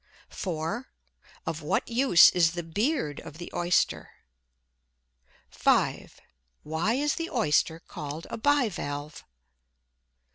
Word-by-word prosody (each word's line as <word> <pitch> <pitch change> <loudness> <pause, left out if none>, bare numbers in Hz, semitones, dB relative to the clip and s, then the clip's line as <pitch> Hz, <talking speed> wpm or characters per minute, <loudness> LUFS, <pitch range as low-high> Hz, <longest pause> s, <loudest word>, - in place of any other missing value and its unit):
4. 180 +7 -4 0.6
Of - - -3
what - - -1
use 240 -6 +6
is 170 -2 +3
the 175 0 -4
"beard" 195 - -1
of 160 -1 -11
the 175 - -8
Oyster? 175 +1 +1 1.4
5. - - +1 0.4
Why 160 +9 0
is 295 +2 +1
the 330 0 -4
Oyster 165 - +1
called 150 +1 -7
a - - -3
bi 285 0 +3
valve? 145 -5 -6
175 Hz, 110 wpm, -27 LUFS, 160-240 Hz, 1.4 s, use